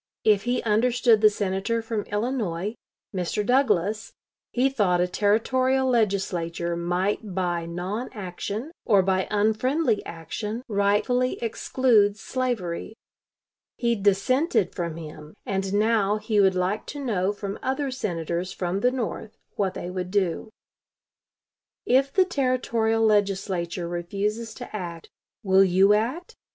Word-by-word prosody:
If 210 -1 +3
he 245 +1 0
understood 230 +1 +3
the 215 - +7
Senator 205 +3 -1
from 225 -2 -3
Illinois, 210 -4 -2 0.4
Mr. 185 +3 -1
Douglas, 220 -5 +1 0.4
he 250 +2 +2
thought 205 -10 +1
a 180 - +2
Territorial 255 +7 +2
Legislature 185 -7 0
might 180 +3 -1
by 175 -3 -1
non 185 +8 -4
action 205 - -5
or 200 -4 +4
by 190 0 +1
unfriendly 220 +4 +1
action 210 +8 -5
rightfully 210 +4 +1
exclude 225 -3 +2
slavery. 220 -6 -3 0.8
He 235 -1 +1
dissented 205 - +2
from 170 -2 -3
him, 155 -1 -10
and 195 -1 -2
now 210 0 +2
he 215 0 0
would 190 -2 +4
like 185 +4 -1
to 290 - -6
know 205 -8 0
from 200 -1 -6
other 270 +1 -1
Senators 175 -6 -3
from 180 +1 -2
the 245 - +3
North 225 -3 -4 0.2
what 195 -2 -1
they 175 - -5
would 180 -1 -4
do: 190 0 0 1.4
"If 270 +2 +3
the 375 +3 +4
Territorial 235 -7 +1
Legislature 190 -4 0
refuses 205 +6 -3
to - - -8
act, 170 -4 -6 0.3
will 190 -1 +5
you 190 +2 +5
act? 250 +12 -1
205 Hz, 125 wpm, -25 LUFS, 185-235 Hz, 1.4 s, the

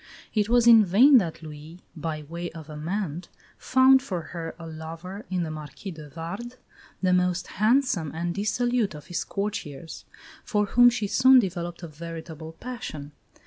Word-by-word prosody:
It 210 -1 +1
was 240 0 +4
in 230 -2 +8
vain 245 +9 +6
that 165 -4 -5
Louis, 155 +2 -10 0.2
by 155 -1 -4
way 170 +3 -6
of 160 -2 -10
amende, 170 +2 -4 0.3
found 260 +1 +5
for 190 -10 -4
her 165 -2 -5
a 165 - -9
lover 165 +5 -8
in 180 -2 -1
the 160 - -4
Marquis 155 +5 -8
de 155 -3 -10
Vardes, 195 - -7 0.5
the 185 -1 +3
most 180 0 +1 0.2
handsome 215 - +2
and 170 +2 -3
dissolute 225 0 0
of 150 - -10
his - - -1
courtiers, 170 -7 -5 0.4
for 210 -1 +1
whom 245 +4 +6
she 235 -3 -2
soon 260 +6 +6
developed 175 -5 -1
a - - -5
veritable 160 0 -8
passion. 190 - -7
175 Hz, 160 wpm, -26 LUFS, 160-215 Hz, 0.5 s, in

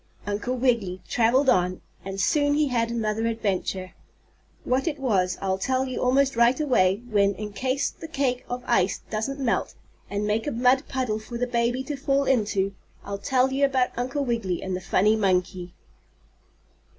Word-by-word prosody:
Uncle 205 +5 -2
Wiggily 230 -8 +1
traveled 245 +4 +2
on, 180 -5 +2 0.2
and 195 0 -5
soon 290 +8 +2
he 300 -1 +2
had 230 -2 0
another 225 -1 -1
adventure. 190 -4 -2 0.7
What 260 +5 0
it 300 -3 -1
was 195 -9 0
I'll 190 -1 -1
tell 260 +5 0
you 255 -1 -4
almost 270 +1 +2
right 235 +3 +4
away, 210 -8 +2
when, 200 -3 +2
in 210 +1 -6
case 260 +5 -1
the 325 - -10
cake 270 -5 -1
of 245 0 -4
ice 190 +1 +1
doesn't 250 +6 -2
melt, 255 -4 -1 0.3
and 205 +1 -2
make 215 +3 0
a - - 0
mud 250 +3 +2
puddle 250 -5 -2
for 235 +2 -7
the 250 - 0
baby 240 +1 0
to 290 +2 -4
fall 275 0 +1
into, 205 -7 +1 0.3
I'll 200 0 -5
tell 260 +4 +1
you 275 +1 0
about 265 -2 +2
Uncle 255 +4 -2
Wiggily 225 -8 -2
and 190 -1 -2
the 185 - -5
funny 210 +4 +3
monkey. 185 -3 -1
235 Hz, 175 wpm, -25 LUFS, 200-265 Hz, 0.7 s, right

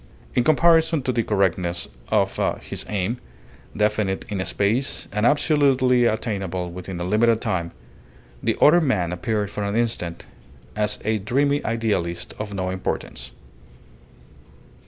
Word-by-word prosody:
In 125 - +2
comparison 160 +1 +4
to 125 - 0
the 120 - +1
correctness 95 -5 0 0.2
of - - +2 0.3
his - - -5
aim, 105 +4 -1 0.6
definite 105 -2 0
in 100 -3 -2
space 105 +8 0
and 105 +3 +2
absolutely 135 -4 +3
attainable 95 -6 -2
within 90 0 -7
a - - -2
limited 110 +4 +3
time, 95 -8 -1 0.7
the - - 0
other 175 +4 +6
man 95 - 0
appeared 105 +1 -2
for 105 - -4
an 100 +1 -2
instant 110 -8 -2 0.5
as 105 0 0
a 110 0 +1
dreamy 140 +7 +1
idealist 105 -7 -2
of 105 -1 -4
no 95 -2 -2
importance. 60 -9 -4
105 Hz, 130 wpm, -23 LUFS, 95-125 Hz, 0.7 s, other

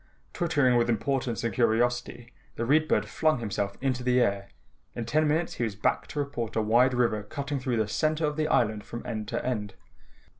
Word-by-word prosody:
Twittering 145 -8 +2
with 120 0 +2
importance 120 -1 -1
and 115 -3 -1
curiosity, 120 +2 0 0.2
the 115 - -2
Read 155 +5 +3
Bird 105 -6 +1
flung 155 +7 +1
himself 100 -3 -3
into 130 -2 0
the 125 0 +2
air. 100 -4 +1 0.5
In 120 - -3
ten 155 +6 +2
minutes 160 +3 0
he - - -3
was 110 -4 -2
back 105 - 0
to - - -9
report 130 -6 -3
a 110 - +2
wide 120 +4 +4
river 115 -4 +1
cutting 140 +6 -4
through 125 -2 -1
the 110 -1 +1
center 155 +8 0
of 150 0 -1
the 155 0 0
island 110 -7 +1
from 120 +2 -8
end 110 -3 -4
to 120 +1 -3
end. 105 -6 -3
120 Hz, 200 wpm, -27 LUFS, 110-140 Hz, 0.5 s, wide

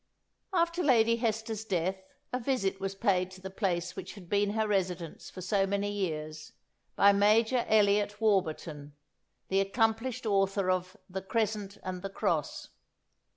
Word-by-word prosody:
" - - -51
After 340 0 +1
Lady 230 -6 +4
Hester's 220 -1 -2
death, 190 -2 -1 0.3
a 250 - 0
visit 230 -7 -1
was 195 0 -3
paid 185 -2 +1
to 185 0 -12
the 190 0 -7
place 180 -3 -1
which 185 - -7
had 180 -4 -12
been 205 0 +2
her 220 0 +1
residence 180 -5 -2
for 185 - -9
so 195 +1 +1
many 200 +1 -1
years, 155 -6 -4 0.4
by 200 - +6
Major 220 +4 +3
Eliot 205 -1 +3
Warburton, 160 -8 0 0.5
the 195 - +2
accomplished 225 +4 0
author 195 -2 +2
of 185 +2 -2
"The 190 +1 -5
Crescent 210 -1 -2
and 185 -1 -4
the 195 - -4
Cross." 195 - -2
200 Hz, 155 wpm, -30 LUFS, 185-220 Hz, 0.5 s, by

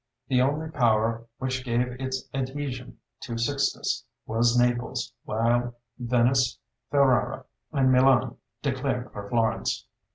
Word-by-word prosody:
The 125 -2 +4
only 145 +4 +1
power 115 -3 +2
which 130 -1 -2
gave 120 0 +1
its 130 0 -3
adhesion 130 -1 -4 0.2
to 115 -3 -5
Sixtus 140 +4 0 0.2
was 115 +2 +2
Naples, 120 -1 0
while 120 +2 +1 0.2
Venice, 125 +1 +2 0.3
Ferrara, 140 -3 +2 0.3
and 135 -3 +3
Milan 130 -2 +4 0.3
declared - - -1
for 100 -1 -7
Florence. 115 -3 0
125 Hz, 110 wpm, -26 LUFS, 115-130 Hz, 0.3 s, The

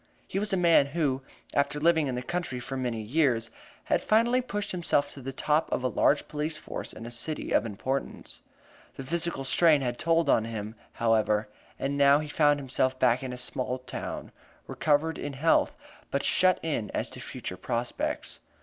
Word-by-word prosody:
He 195 - -2
was 210 +1 -1
a 190 - +2
man 170 -5 +5
who, 140 -3 0 0.3
after 140 +1 +1
living 160 -1 +3
in 130 - -2
the 125 - -3
country 175 -4 -3
for 135 +2 -5
many 120 -4 -2
years, 120 -2 +1 0.3
had - - 0
finally 235 +4 +3
pushed 205 -4 -3
himself 155 -5 0
to 140 - -10
the 135 +1 -5
top 150 +4 0
of - - -1
a - - +2
large 145 +3 +2
police 150 +1 -3
force 155 - -6
in 115 - -9
a 120 - -6
city 150 +6 -3
of 110 - +3
importance. 130 +6 -4 0.5
The 135 - -6
physical 170 0 -1
strain 155 +1 +4
had 120 -2 -2
told 165 0 +2
on 110 - +3
him, 110 -1 -5 0.2
however, 110 -2 +1 0.3
and 140 +1 -2
now 140 0 +7
he 150 0 -3
found 145 -1 +3
himself 130 -1 0
back 125 -1 +3
in 130 -1 -4
a 125 - -6
small 125 0 -2
town, 130 - -6 0.3
recovered 155 +2 +1
in 145 - -4
health, 155 +5 +2 0.3
but - - -1
shut 185 0 +4
in 145 -10 -2
as - - -2
to - - -8
future - - -6
prospects. 120 0 -3
140 Hz, 185 wpm, -28 LUFS, 125-160 Hz, 0.5 s, now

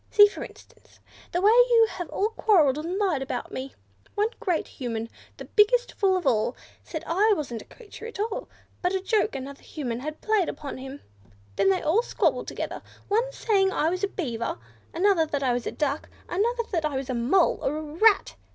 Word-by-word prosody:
"See, 415 - +8
for 410 - -3
instance, - - -15 0.3
the 350 - 0
way 420 - +7
you 475 -1 +6
have 355 -5 -6
all 415 +2 0
quarrelled 330 -12 +3
and 340 +5 -3
lied 375 -9 +1
about 255 -2 -4
me! 260 +1 -4 0.4
First - - -35
one 420 +2 +2
great 365 -8 -1
Human, 230 -4 -5 0.3
the - - -8
biggest 485 +4 +3
fool 385 -2 +2
of 360 - -5
all, 225 -5 +2 0.3
said 315 - -6
I 410 +6 +3
wasn't 245 -7 -4
a - - -14
live - - -35
creature 455 -1 -10
at 460 - -9
all, 450 +4 -3 0.3
but 360 +1 +1
a - - +1
joke 425 +3 +1
another 275 +1 -7
Human 245 -6 -4
had 305 +4 -6
played 430 -6 +1
upon 280 -3 -6
him. 270 +2 -8 0.5
Then 195 - +3
they 190 - +1 0.2
squabbled - - 0
together - - -5 0.3
one 465 +5 +1
saying 390 -6 +2
I 320 -3 +1
was 365 +2 -3
a - - +3
Beaver; 240 - -3 0.3
another, 350 -2 +3
that 285 -2 -2
I 250 -2 +2
was 245 0 -2
a - - -2
Duck; 295 0 -2 0.2
another, 470 +6 0
that 335 -4 0
I 300 -2 -1
was 265 -1 -3
a - - -1
Mole, 250 +10 +2
or 295 +3 -1
a - - -3
Rat. 345 - +3
350 Hz, 205 wpm, -26 LUFS, 275-420 Hz, 0.5 s, See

